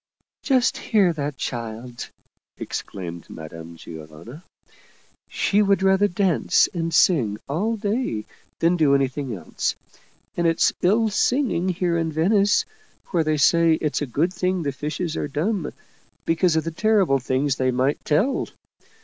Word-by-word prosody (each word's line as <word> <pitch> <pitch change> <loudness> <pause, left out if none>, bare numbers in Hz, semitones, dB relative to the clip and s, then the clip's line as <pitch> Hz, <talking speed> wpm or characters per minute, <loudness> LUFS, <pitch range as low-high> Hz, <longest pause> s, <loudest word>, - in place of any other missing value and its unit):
" - - -70
Just 255 -3 +2
hear 200 -6 +2
that 145 -2 -4
child! 120 0 -5 0.3
" - - -54
exclaimed 85 -3 -6
Madame 80 +1 -9
Giovanna. 80 - -11 0.5
" - - -34
She 205 +1 +1
would 200 -2 +2
rather 190 +1 +4
dance 185 -3 +2
and 165 -2 -2
sing 125 - +3
all 200 +11 -1
day 205 - -2 0.3
than 170 +2 +2
do 145 -4 +4
any 135 -1 +3
thing 130 -3 -5
else. 85 -5 -3 0.6
And 170 -1 +1
it's 165 0 +2
ill 220 +5 +3
singing 230 -5 +1
here 175 -1 0
in 165 -1 -1
Venice, 195 +6 +2 0.5
where 170 -3 +2
they 155 0 0
say 165 +3 +4
it's 150 -2 -2
a 145 - -2
good 160 +9 0
thing 180 0 -1
the 140 - -1
fishes 150 +5 -4
are - - -2
dumb, 165 +4 -2 0.5
because 165 0 +2
of, 160 - +1
the 165 - -4
terrible 190 -6 +2
things 130 +2 0
they 130 0 +1
might 130 +3 0
tell. 205 - +1
160 Hz, 155 wpm, -23 LUFS, 135-190 Hz, 0.6 s, rather